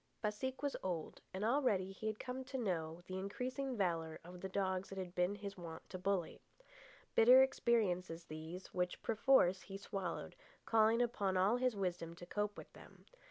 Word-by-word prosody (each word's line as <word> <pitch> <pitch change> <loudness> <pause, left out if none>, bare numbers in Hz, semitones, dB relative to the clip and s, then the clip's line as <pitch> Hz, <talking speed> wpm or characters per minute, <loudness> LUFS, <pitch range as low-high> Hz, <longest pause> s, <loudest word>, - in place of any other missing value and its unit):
Baseek 255 +6 -2
was 285 - 0
old, 175 -4 -3
and 190 +3 -2
already 220 -7 +2
he 205 +3 -5
had 215 -1 -1
come 255 +1 -4
to 265 0 -4
know 175 -7 -2
the 185 0 -4
increasing 250 +6 -3
valour 165 -5 0
of 180 +1 -10
the 190 - -4
dogs 190 -1 -1
it 195 - -6
had 185 -2 -4
been 180 +2 +1
his 200 -1 -7
wont 165 -2 -8
to 185 - -5
bully. 190 -2 -1 0.7
Bitter 250 +3 +8
experiences 185 -10 +1
these, 160 +4 -8
which, 180 0 -1
perforce, 215 -5 +4
he 195 - -7
swallowed, 195 -3 -4 0.3
calling 225 +1 +4
upon 200 -5 0
all 195 +5 +4
his 250 -2 +1
wisdom 175 -4 -2
to 175 - -10
cope 210 +2 -2
with - - -10
them. - - -15
195 Hz, 175 wpm, -38 LUFS, 180-230 Hz, 0.7 s, Bitter